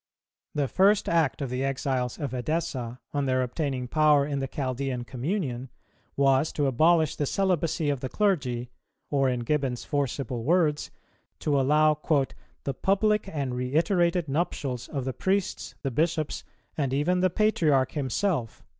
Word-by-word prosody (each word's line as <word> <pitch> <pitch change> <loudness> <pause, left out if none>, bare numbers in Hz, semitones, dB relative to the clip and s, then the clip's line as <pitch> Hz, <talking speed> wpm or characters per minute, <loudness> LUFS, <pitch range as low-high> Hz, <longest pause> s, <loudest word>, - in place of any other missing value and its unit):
The 145 -2 +1
first 195 +7 +3
act 160 -4 +1
of 130 - -4
the 125 +1 -1
exiles 130 -2 -1
of 140 -4 -3
Edessa, 130 -3 -2
on 140 -1 0
their 130 0 +2
obtaining 130 -1 -2
power 150 0 +4
in 140 -1 -2
the 135 - -2
Chaldean 130 -2 -3
communion, 130 - -3 0.5
was 135 +2 +3
to 145 - 0
abolish 155 +4 +3
the 145 - -1
celibacy 170 -5 +1
of 140 - -2
the 130 - -4
clergy, 130 - 0 0.4
or, 135 -2 +3
in 125 -1 -1
Gibbon's 130 -1 -1
forcible 135 -4 -2
words, 155 0 +2 0.5
to 145 -2 +2
allow 150 +2 +3 0.6
"the 140 - -2
public 200 - +1
and 140 -5 -2
reiterated 170 +7 +1
nuptials 135 -4 -2
of 135 -4 -4
the 130 - -2
priests, 190 +4 -1
the 135 - -1
bishops, 155 +3 -1 0.3
and 135 -3 -1
even 175 +6 +1
the 185 +1 +3
patriarch 155 - +2
himself." 140 - -1
140 Hz, 145 wpm, -27 LUFS, 130-165 Hz, 0.6 s, power